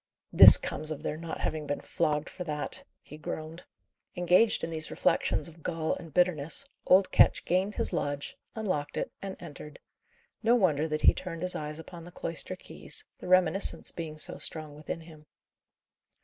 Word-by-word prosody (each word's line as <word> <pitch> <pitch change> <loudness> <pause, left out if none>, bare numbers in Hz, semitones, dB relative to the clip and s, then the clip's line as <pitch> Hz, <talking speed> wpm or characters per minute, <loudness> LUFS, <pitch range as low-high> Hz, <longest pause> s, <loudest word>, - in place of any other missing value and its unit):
"This - - +11
comes 155 - +2
of 155 - -4
their - - -2
not 165 +1 -6
having 155 -2 -2
been 145 - -2
flogged 150 0 -1
for 180 - -7
that!" 150 -2 -4 0.2
he 150 - -12
groaned. 160 +2 -6 0.5
Engaged 180 +5 +3
in 165 - -3
these 155 -1 -4
reflections 150 - +1
of 165 0 -14
gall 165 -1 -1
and 165 -3 -8
bitterness, 175 - +1 0.2
old 190 +1 +5
Ketch - - +4
gained 190 +4 0
his - - -1
lodge, 145 0 -3 0.2
unlocked 185 -10 -2
it, - - -2
and 195 -1 -6
entered. 150 -2 -10 0.6
No 235 +1 +4
wonder 160 -9 +2
that 155 -1 -2
he - - +6
turned 170 -2 -6
his 180 - 0
eyes 150 0 -5
upon 165 +1 -9
the 175 - -11
cloister 165 -2 -4
keys, - - -5
the - - -8
reminiscence 185 +1 +2
being 160 -2 -6
so - - -6
strong 155 -2 -4
within 150 +2 -6
him. 155 -2 -15
160 Hz, 175 wpm, -29 LUFS, 150-180 Hz, 0.6 s, This